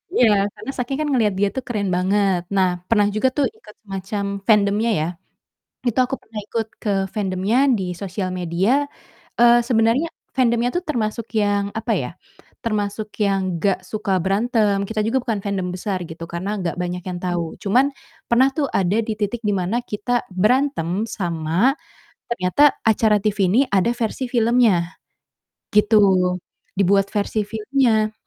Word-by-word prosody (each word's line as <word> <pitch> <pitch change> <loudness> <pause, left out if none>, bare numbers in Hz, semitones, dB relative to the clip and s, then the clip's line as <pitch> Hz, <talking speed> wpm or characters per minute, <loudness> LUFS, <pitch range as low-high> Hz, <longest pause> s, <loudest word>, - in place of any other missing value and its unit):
Iya, 245 - +5 0.3
karena 270 - -6
saking 255 +2 -2
kan 305 - -1
ngeliat 220 -6 +2
dia 205 - +3
tuh 260 - -3
keren 205 -5 -1
banget. 190 0 +2
Nah, 190 -1 +4 0.2
pernah 210 -3 +4
juga 240 +5 +2
tuh 280 - +3
ikut 210 - -16
semacam 195 +1 -4 0.2
fandomnya, 210 +1 +3
ya. 160 - 0 0.8
Itu 240 +2 +1
aku 270 - -3
pernah 220 -1 -8
ikut 225 -1 -2 0.2
ke 215 - -1 0.3
fandomnya 195 +3 0 0.2
di 190 - -3 0.2
sosial 190 0 -3
media, 190 - +1 0.5
eee, 240 0 +7
sebenernya 230 +6 +3 0.3
fandomnya 235 -1 +2
tuh 355 - 0
termasuk 230 -3 -2 0.2
yang, 205 0 +1
apa - - -1
ya, - - -4 0.6
termasuk 210 -1 -2 0.2
yang 195 -1 +2 0.2
nggak 185 +1 +1
suka 210 -1 -3
berantem, 210 +1 +2
kita 220 -1 -2
juga 260 +4 +2
bukan 225 -5 -2
fandom 195 -3 -2
besar 190 +1 -2
gitu, 165 +1 -7
karena 185 +4 -3
gak 170 0 -2
banyak 180 0 -4
yang 180 -1 -4
tau. 175 -3 -2
Cuman 245 +7 +3 0.4
pernah 255 +3 +5
tuh 290 -2 +1
ada 190 +2 +1
di 220 - -1
titik 215 +3 -2
di 205 - +2
mana 185 +5 -1
kita 245 +3 -2
berantem 215 - +1
sama 175 +4 0 0.6
ternyata 185 +4 +1 0.3
acara 215 -1 +4
TV 210 -1 0
ini 205 - +3
ada 200 +4 +2
versi 240 +2 -2
filmnya, 225 -7 +3 0.9
gitu. 210 +1 +5 0.8
Dibuat 195 0 +3
versi 210 0 0
filmnya. 220 -1 +1
210 Hz, 155 wpm, -21 LUFS, 195-235 Hz, 0.9 s, eee